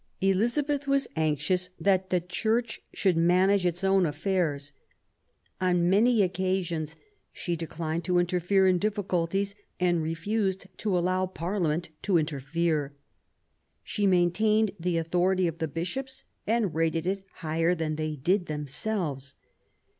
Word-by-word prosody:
Elizabeth 255 +9 +1
was 275 0 +2
anxious 160 +4 0
that 190 -1 +2
the 180 - +2
Church 220 +7 -1
should 190 -4 +1
manage 180 +3 +3
its 175 +2 -3
own 190 -2 +4
affairs. 150 -3 -1 0.9
On 180 -2 +2
many 220 +2 +4
occasions 180 -4 -1 0.4
she 175 -3 -3
declined 165 0 -3
to 180 0 +2
interfere 180 +2 +2
in 180 -1 +3
difficulties 195 -1 0 0.3
and 175 -2 +2
refused 190 +5 -1
to 205 -4 0
allow 185 +1 +1
Parliament 175 -2 -2
to 195 -4 +2
interfere. 150 0 -1 0.9
She 205 -2 0
maintained 200 +4 +3
the 175 0 0
authority 180 +3 +1
of 165 0 -4
the 160 - -1
Bishops 185 - -4 0.2
and 220 -5 +1
rated 165 0 0
it 195 +1 -1
higher 165 +2 0
than 160 -2 -2
they 155 0 -2
did 175 +6 +1
them 150 -1 -3
selves. 140 -5 -3
180 Hz, 130 wpm, -28 LUFS, 165-195 Hz, 0.9 s, own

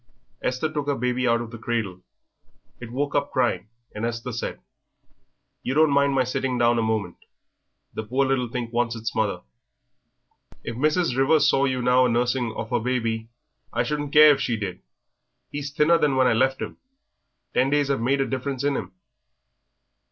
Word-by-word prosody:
Esther 130 +5 -1
took 145 -2 -3
her 145 - +1
baby 125 0 0
out 115 0 +2
of 115 -1 -7
the 115 - -9
cradle. 110 -6 -3 0.8
It 115 -1 -9
woke 140 +3 -2
up 140 -1 0
crying, 115 -7 0 0.3
and 105 - -6
Esther 115 +1 -3
said, 115 - -4 1.0
"You 130 - -3
don't 155 -1 +5
mind 140 0 +3
my 130 - +3
sitting 130 0 -2
down 120 0 +3
a - - +2
moment. 110 -5 -1 0.8
The - - -3
poor 130 +6 0
little 130 -2 0
thing 120 0 -4
wants 120 -1 0
its 115 0 -4
mother." 105 -5 -1 1.2
"If 115 - -5
Mrs. 155 +2 +1
Rivers 145 +3 +4
saw 135 - +3
you 130 -2 -1
now 125 +1 +4
a - - -1
nursing 120 0 0
of 115 +2 -6
yer 120 - +2
baby?" 115 -2 -2 0.4
"I - - 0
shouldn't 145 -1 -3
care 150 0 +8
if 145 - +1
she 115 -3 0
did. 95 -4 -5 0.7
He's 145 -1 -4
thinner 150 +4 +3
than 145 -3 +2
when 130 0 +4
I 125 - +4
left 130 +3 +1
him; - - -7 0.8
ten 130 +2 +2
days 145 -1 +2
'ave 135 - 0
made 135 +4 +1
a - - +1
difference 130 0 -3
in 145 -1 +1
him." 95 -7 -5
125 Hz, 185 wpm, -24 LUFS, 115-140 Hz, 1.2 s, care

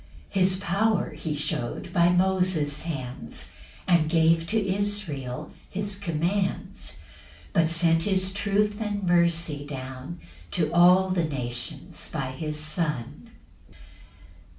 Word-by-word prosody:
7 195 - +1
[His 185 0 +5
power 200 +2 +1
he 155 -2 -4
shew'd 130 -4 -3
by 170 0 +5
Moses' 180 -5 +2
hands, 130 - -5 0.4
And 170 -4 +4
gave 165 0 +3
to 220 - +1
Israel 195 -10 -2 0.2
his 200 +1 -3
commands; 185 - -2 0.6
But 165 -1 +3
sent 165 0 +3
his 190 -1 +1
truth 205 +1 0
and 205 -2 -2
mercy 170 -4 +2
down 135 +3 -7 0.3
To 165 -3 0
all 180 +2 +6
the 175 -3 +1
nations 130 0 -4
by 135 -5 -2
his 150 +3 -4
Son. 150 - -2
170 Hz, 115 wpm, -26 LUFS, 150-190 Hz, 0.6 s, all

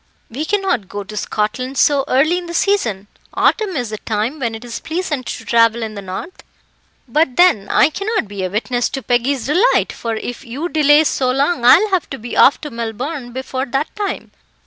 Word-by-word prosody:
"We 285 +7 -3
cannot 385 - -1
go 205 0 -5
to 210 +2 -10
Scotland 240 +6 -2
so 280 -1 +3
early 310 +7 +2
in 350 - -9
the 340 - -6
season. 235 - 0 0.3
Autumn 420 -4 +1
is 245 -5 -3
the 215 - -5
time 225 +7 -2
when 235 -4 -2
it 225 - -9
is 235 -1 -6
pleasant 320 -5 -3
to - - -6
travel 230 0 +3
in 220 -1 -5
the 200 - -7
north." 190 - -7 0.7
"But 265 +1 +1
then 315 - +4
I 300 - +4
cannot 405 - -2
be 200 -1 -5
a 185 - -1
witness 240 +4 -1
to 270 - -5
Peggy's 245 +2 0
delight, 365 - +2
for 230 -1 -4
if 245 +4 -6
you 275 +8 -5
delay 300 -1 +5
so 260 -4 0
long 275 +2 +1
I 245 - +8
will 420 +3 -1
have 370 -4 0
to 270 - -5
be 240 +1 -7
off 275 - +5
to 295 - -6
Melbourne 240 +4 -5
before 260 +1 -4
that 270 +4 -2
time. 415 -1 -4
260 Hz, 205 wpm, -18 LUFS, 230-315 Hz, 0.7 s, I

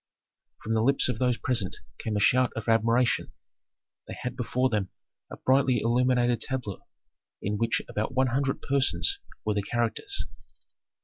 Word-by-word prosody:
From 110 - -1
the 110 - +2
lips 135 +2 +3
of 120 -3 -2
those 125 -2 +2
present 115 -7 -1 0.2
came 110 -2 -2
a - - +1
shout 125 +4 +4
of 110 - -5
admiration. 115 +2 +2 0.7
They - - -6
had 125 0 -4
before 125 +1 0
them 105 -6 -1 0.4
a - - -8
brightly 130 -2 +3
illuminated 120 +1 +2
tableau 125 -7 -4 0.5
in 105 +1 -2
which 115 0 +1
about 110 +5 -3
one 130 0 +3
hundred 135 0 0
persons 140 - +1 0.3
were 105 - +1
the 100 - 0
characters. 120 - -2
120 Hz, 150 wpm, -27 LUFS, 110-130 Hz, 0.7 s, shout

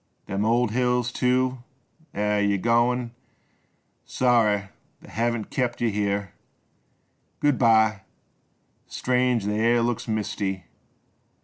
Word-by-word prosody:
Them 100 +2 -2
old 120 0 +2
hills, 125 0 0
too 130 0 0 0.3
— 160 0 -34
eh! 105 0 0
Yer 100 -1 +1
goin'? 120 +3 +1 0.9
Sorry 110 -6 +1 0.3
t' - - -14
hev 115 -1 -2
kept 120 -3 -1
yuh 115 -2 +1
here. 100 -1 -2 1.1
Good 145 -3 +1
by! 110 -3 +4 0.9
Strange 125 -3 0
th' - - -1
air 115 +3 +2
looks 120 -1 -2
misty 100 -4 -3
115 Hz, 110 wpm, -24 LUFS, 105-125 Hz, 1.1 s, by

